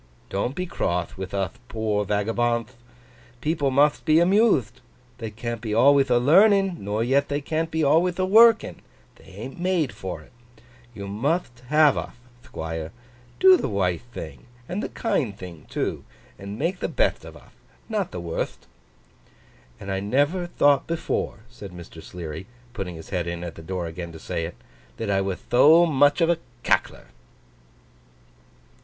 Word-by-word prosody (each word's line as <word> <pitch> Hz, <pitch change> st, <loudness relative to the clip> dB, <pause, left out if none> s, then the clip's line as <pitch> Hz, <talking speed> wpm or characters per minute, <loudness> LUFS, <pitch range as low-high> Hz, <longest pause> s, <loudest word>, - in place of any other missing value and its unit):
Don't 110 Hz, +7 st, -2 dB
be 180 Hz, -, -2 dB
croth 90 Hz, -, -2 dB
with 95 Hz, -1 st, -6 dB
uth 100 Hz, +4 st, -3 dB
poor 110 Hz, -3 st, -1 dB
vagabondth. 115 Hz, +4 st, 0 dB, 0.7 s
People 150 Hz, 0 st, 0 dB
mutht 145 Hz, +3 st, +3 dB
be 155 Hz, -1 st, +3 dB
amuthed. 175 Hz, -, +3 dB, 0.4 s
They 115 Hz, -2 st, -4 dB
can't 115 Hz, +1 st, -5 dB
be 110 Hz, -3 st, -3 dB
alwayth 140 Hz, 0 st, +5 dB
a 120 Hz, -, +4 dB
learning, 190 Hz, -, +4 dB
nor 105 Hz, +3 st, -2 dB
yet 140 Hz, +4 st, +2 dB
they 145 Hz, 0 st, 0 dB
can't 160 Hz, +3 st, -2 dB
be 160 Hz, -1 st, -1 dB
alwayth 170 Hz, +5 st, +3 dB
a 185 Hz, -, +1 dB
working, 225 Hz, +3 st, +5 dB, 0.4 s
they -, -, -20 dB, 0.2 s
an't 135 Hz, +6 st, -8 dB
made 175 Hz, -6 st, 0 dB
for 90 Hz, -4 st, -6 dB
it. -, -, -19 dB, 0.6 s
You 100 Hz, -1 st, -6 dB
mutht 120 Hz, -, -2 dB
have 150 Hz, 0 st, +4 dB
uth, -, -, -7 dB, 0.3 s
Thquire. 80 Hz, 0 st, -5 dB, 0.5 s
Do 375 Hz, 0 st, +8 dB
the -, -, -3 dB
withe 90 Hz, -4 st, 0 dB
thing 80 Hz, -, -9 dB, 0.2 s
and 185 Hz, +4 st, -3 dB
the -, -, -4 dB
kind 120 Hz, -, -1 dB
thing 85 Hz, -4 st, -10 dB
too, -, -, -3 dB, 0.4 s
and 100 Hz, +1 st, -7 dB
make 170 Hz, +7 st, -1 dB
the -, -, -2 dB
betht -, -, 0 dB
of -, -, -11 dB
uth; -, -, -20 dB, 0.3 s
not 210 Hz, -5 st, -1 dB
the 90 Hz, -, -6 dB
wurtht!' 85 Hz, -1 st, -4 dB, 1.1 s
'And 100 Hz, -1 st, -6 dB
I 95 Hz, -, -1 dB
never 145 Hz, -, 0 dB
thought 145 Hz, -5 st, +3 dB
before,' 160 Hz, -10 st, -2 dB
said 115 Hz, -5 st, -10 dB
Mr. 85 Hz, -2 st, -11 dB
Sleary, 85 Hz, +1 st, -8 dB, 0.3 s
putting 95 Hz, -7 st, -5 dB
his 80 Hz, -, -11 dB
head 90 Hz, -3 st, -1 dB
in 85 Hz, 0 st, -4 dB
at 85 Hz, -2 st, -6 dB
the 80 Hz, -, -11 dB
door 90 Hz, +1 st, -4 dB
again 85 Hz, +1 st, -6 dB
to 80 Hz, -, -10 dB
say 85 Hz, -, -3 dB
it, 85 Hz, -, -7 dB, 0.4 s
'that 110 Hz, -3 st, -2 dB
I 95 Hz, 0 st, +2 dB
wath 95 Hz, -1 st, -4 dB
tho 155 Hz, +8 st, +7 dB
muth 145 Hz, 0 st, +3 dB
of 165 Hz, +1 st, +4 dB
a 170 Hz, -, 0 dB, 0.2 s
Cackler! -, -, 0 dB
120 Hz, 165 wpm, -24 LUFS, 95-160 Hz, 1.1 s, Do